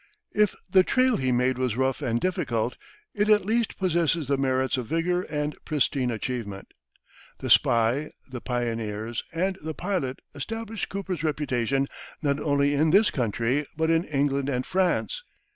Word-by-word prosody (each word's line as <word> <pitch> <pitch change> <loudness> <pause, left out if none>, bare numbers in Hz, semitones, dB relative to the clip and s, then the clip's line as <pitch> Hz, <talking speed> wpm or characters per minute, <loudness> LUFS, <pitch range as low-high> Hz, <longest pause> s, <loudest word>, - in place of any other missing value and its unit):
If 210 -2 +3
the 185 +1 +6
trail 255 +5 +3
he 130 -1 0
made 125 +1 +2
was 125 -3 0
rough 130 +2 +1
and 120 -4 0
difficult, 125 -10 -1 0.4
it 210 +1 +1
at 210 -3 +5
least 225 +1 0
possesses 170 -4 +1
the 140 - +2
merits 130 -1 +1
of 125 -3 -3
vigor 170 +3 +1
and 150 -3 -3
pristine 140 -3 +1
achievement. 110 -4 -4 0.7
"The - - -3
Spy," 120 +6 +4 0.2
"The 130 -3 -7
Pioneers," 115 -2 -2
and 190 +3 -1
"The 155 0 -5
Pilot" 175 -9 -2 0.2
established 225 +8 -4
Cooper's 185 -5 -4
reputation 135 -3 0 0.3
not 140 -1 0
only 145 -1 +2
in 155 +3 +3
this 200 +6 +5
country, 125 +3 0
but 160 0 +2
in 165 0 +3
England 140 -1 0
and 125 -2 -1
France. 190 - 0
145 Hz, 155 wpm, -26 LUFS, 125-180 Hz, 0.7 s, the